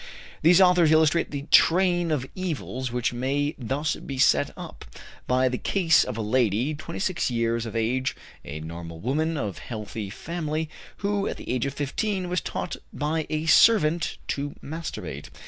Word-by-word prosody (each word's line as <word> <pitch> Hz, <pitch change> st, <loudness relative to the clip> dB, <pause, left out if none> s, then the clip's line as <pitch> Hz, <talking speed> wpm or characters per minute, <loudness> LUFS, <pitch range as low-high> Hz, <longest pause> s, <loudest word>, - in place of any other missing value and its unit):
These 170 Hz, +3 st, +6 dB
authors 180 Hz, -4 st, +5 dB
illustrate 160 Hz, +1 st, +4 dB
the 140 Hz, -1 st, -4 dB
train 175 Hz, 0 st, +4 dB
of 145 Hz, -5 st, 0 dB
evils 140 Hz, -8 st, -4 dB
which 125 Hz, +1 st, -1 dB
may 140 Hz, +4 st, -1 dB
thus 135 Hz, +5 st, -1 dB
be 135 Hz, -, -7 dB
set 70 Hz, -, +4 dB
up, -, -, -9 dB, 0.4 s
by 130 Hz, +1 st, +3 dB
the 125 Hz, -1 st, -2 dB
case 170 Hz, -5 st, +3 dB
of 125 Hz, -3 st, -5 dB
a 110 Hz, -, -2 dB
lady, 120 Hz, +4 st, +1 dB
26 170 Hz, +3 st, -2 dB
years 115 Hz, -1 st, 0 dB
of 110 Hz, -, -7 dB
age, 125 Hz, +4 st, 0 dB, 0.3 s
a 75 Hz, +2 st, -7 dB
normal 85 Hz, +1 st, -8 dB
woman, 155 Hz, -, 0 dB
of 105 Hz, -9 st, -3 dB
healthy 105 Hz, -2 st, -6 dB
family, 155 Hz, -, -4 dB, 0.3 s
who, 200 Hz, 0 st, 0 dB
at -, -, -4 dB
the -, -, -11 dB
age 125 Hz, +1 st, 0 dB
of 135 Hz, -, -5 dB
15, 185 Hz, +7 st, -2 dB
was 180 Hz, 0 st, 0 dB
taught 180 Hz, -, -4 dB
by 155 Hz, +1 st, -2 dB
a 155 Hz, +1 st, -2 dB
servant 165 Hz, -2 st, +4 dB
to 145 Hz, 0 st, -3 dB
masturbate. 90 Hz, -, -6 dB
145 Hz, 165 wpm, -25 LUFS, 120-165 Hz, 0.4 s, These